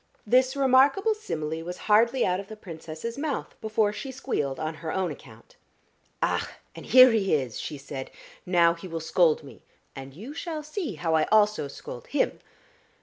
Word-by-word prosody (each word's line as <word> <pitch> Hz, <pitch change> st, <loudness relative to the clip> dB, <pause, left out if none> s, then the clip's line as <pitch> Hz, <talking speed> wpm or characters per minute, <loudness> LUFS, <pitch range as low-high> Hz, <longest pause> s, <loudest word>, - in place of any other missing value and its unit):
This 255 Hz, +4 st, +3 dB
remarkable 275 Hz, -, +4 dB
simile 160 Hz, -, -4 dB
was 180 Hz, +1 st, -6 dB
hardly 230 Hz, +4 st, +4 dB
out 180 Hz, 0 st, 0 dB
of 200 Hz, -, -8 dB
the 215 Hz, -, -9 dB
Princess's 170 Hz, -, -7 dB
mouth 295 Hz, -2 st, -3 dB
before 215 Hz, -1 st, +1 dB
she 270 Hz, +5 st, -6 dB
squealed 145 Hz, -, -3 dB
on 155 Hz, 0 st, -2 dB
her 160 Hz, -1 st, -3 dB
own 190 Hz, -2 st, -1 dB
account. -, -, -14 dB, 0.7 s
"Ach, -, -, 0 dB, 0.3 s
and -, -, -10 dB
here 255 Hz, 0 st, +8 dB
he 200 Hz, -7 st, +2 dB
is," 130 Hz, -6 st, -3 dB
she 150 Hz, -, -5 dB
said. 135 Hz, -1 st, -7 dB, 0.3 s
"Now 170 Hz, -2 st, +4 dB
he 170 Hz, +2 st, -10 dB
will 165 Hz, -2 st, -4 dB
scold 160 Hz, 0 st, +2 dB
me, 140 Hz, -, -13 dB, 0.3 s
and 135 Hz, 0 st, -9 dB
you 225 Hz, -, -8 dB
shall 320 Hz, -1 st, -5 dB
see 305 Hz, -, -4 dB
how 160 Hz, +1 st, -1 dB
I 160 Hz, -1 st, +3 dB
also 210 Hz, -7 st, +3 dB
scold 140 Hz, -, -9 dB
him." -, -, 0 dB
195 Hz, 175 wpm, -26 LUFS, 160-255 Hz, 0.7 s, here